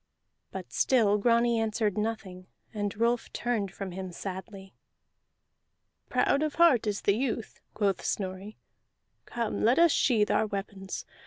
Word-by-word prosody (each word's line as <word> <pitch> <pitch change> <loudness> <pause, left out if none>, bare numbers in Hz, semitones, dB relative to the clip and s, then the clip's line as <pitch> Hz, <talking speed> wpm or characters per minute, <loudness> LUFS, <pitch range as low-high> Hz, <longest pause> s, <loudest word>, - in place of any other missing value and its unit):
But - - -8
still 215 -5 +3
Grani 235 +1 +3
answered 215 -2 0
nothing, 210 -4 -4 0.3
and 205 -1 -3
Rolf 235 +1 0
turned 225 -6 -1
from 195 0 -6
him 185 0 -6
sadly. 190 +1 -8 1.4
"Proud 280 - +2
is 305 -1 -1
the - - -16
heart 300 -10 +5
of 205 -1 -3
youth," 225 +2 -1
quoth 200 -3 0
Snorri. 195 +2 -4 0.7
"Come, 235 -2 -2
let 240 +4 +4
us 340 -1 +6
sheathe 220 -8 +2
our 220 - +2
weapons. 195 -1 -5
215 Hz, 135 wpm, -28 LUFS, 195-235 Hz, 1.4 s, us